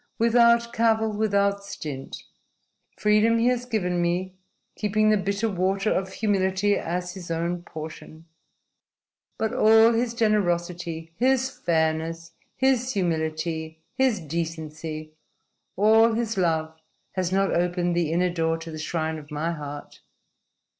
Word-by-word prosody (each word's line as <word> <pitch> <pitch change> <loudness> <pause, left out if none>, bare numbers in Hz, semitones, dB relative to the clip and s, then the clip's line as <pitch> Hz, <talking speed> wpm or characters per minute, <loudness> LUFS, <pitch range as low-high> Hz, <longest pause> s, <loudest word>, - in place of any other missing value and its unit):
Without 235 0 +4
cavil, 220 -1 +2
without 200 -1 +1
stint. 145 -8 -7 0.7
Freedom 215 +2 +3
he 230 - +1
has 250 -1 -1
given 180 -7 0
me, 180 +2 -1 0.4
keeping 215 +1 +2
the - - +5
bitter 200 +2 -1
water 195 +1 0
of 190 0 -2
humility 200 -1 +1
as 180 +1 -3
his 180 -3 -9
own 170 +1 -2
portion. 160 -1 -9 1.1
But 220 0 -1
all 225 +1 +6
his 235 0 0
generosity, 175 -6 -1
his 265 +1 +2
fairness, 165 -2 -1 0.2
his 260 -1 +1
humility, 160 -3 -2
his 260 -6 +2
decency 155 -1 -5 0.6
all 220 +3 +5
his 225 0 -1
love 160 -4 0 0.4
has 185 -2 -2
not 195 +1 +1
opened 175 0 0
the 170 -3 0
inner 180 +2 +1
door 165 -1 0
to 165 0 -8
the 155 - -7
shrine 160 0 -2
of 150 -1 -14
my 155 +2 -2
heart. 145 -2 -8
180 Hz, 125 wpm, -25 LUFS, 165-220 Hz, 1.1 s, all